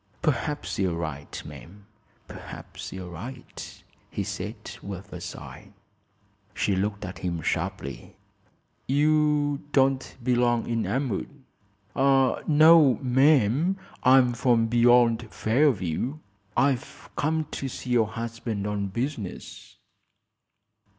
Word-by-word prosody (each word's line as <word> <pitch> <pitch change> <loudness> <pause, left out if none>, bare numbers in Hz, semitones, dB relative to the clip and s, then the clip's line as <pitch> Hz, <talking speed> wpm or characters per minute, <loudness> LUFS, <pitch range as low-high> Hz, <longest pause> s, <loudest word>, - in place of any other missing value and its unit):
"Perhaps 150 - -1
you're 95 -3 +1
right, 80 -4 -5
ma'am; 100 +4 -12 0.4
perhaps - - -9
you're 90 -2 -7
right," 120 +10 -9 0.3
he - - -3
said, - - -5 0.2
with 100 0 -8
a 90 - -7
sigh. 90 - -9 0.8
She 100 - +1
looked 100 +1 -2
at 95 - -7
him 85 -3 -3
sharply. 65 -3 -3 0.7
"You 150 0 +2
don't 135 -1 +2
belong 120 -1 +2
in 115 -1 -1
Elmwood." 135 +2 -3 0.5
"No, 140 +1 +5
ma'am; 135 - +3 0.2
I'm 130 -1 +5
from 120 -1 +2
beyond 120 -1 +4
Fairview. 120 - +1 0.4
I've 130 0 0
come 155 +1 0
to 135 - -4
see 125 0 -6
your 115 -3 +3
husband 115 -2 -4
on 105 -1 -2
business." 115 -1 -5
120 Hz, 105 wpm, -26 LUFS, 100-135 Hz, 0.8 s, No